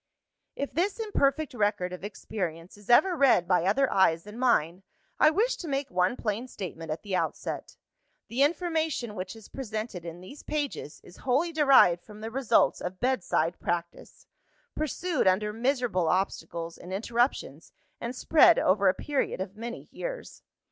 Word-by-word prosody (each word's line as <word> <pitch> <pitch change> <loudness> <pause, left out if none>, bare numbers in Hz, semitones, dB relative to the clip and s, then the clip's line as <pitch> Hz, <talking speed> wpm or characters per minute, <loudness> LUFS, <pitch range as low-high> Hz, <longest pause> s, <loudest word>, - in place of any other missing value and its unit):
"If 280 - -4
this 370 +6 0
imperfect 315 - 0
record 205 -5 0
of 180 - -8
experience 180 -4 -5
is 205 +1 -18
ever 355 +9 +5
read 260 - +4
by 180 -2 +2
other 270 +8 +3
eyes 170 -4 +3
than 210 +3 -10
mine, 185 -8 +2 0.4
I 305 - +7
wish 440 +10 +1
to 340 - -7
make 275 -1 -2
one 180 +4 +1
plain 225 +3 -2
statement 165 -8 -7
at 155 +1 -4
the 200 -2 -2
outset. - - -3 0.5
The 245 +4 -2
information 320 - 0
which 185 -1 -6
is 220 -2 -13
presented 220 -7 -5
in 170 0 -8
these 190 +11 -11
pages 290 - -4
is 175 - -15
wholly 275 +7 +1
derived 275 - +5
from 210 +3 -13
the 225 +1 -5
results 260 -1 +2
of 180 +1 -5
bedside 180 -9 0
practice; 170 0 -4 0.5
pursued 310 - -1
under 210 +3 +2
miserable 240 - 0
obstacles 170 -2 -2
and 180 - -10
interruptions, 225 - -1 0.3
and 235 +2 -5
spread 325 +6 +5
over 195 +1 +3
a 185 - +1
period 290 -8 -2
of 190 +1 -5
many 235 +2 -7
years. - - -7
215 Hz, 160 wpm, -28 LUFS, 180-275 Hz, 0.5 s, I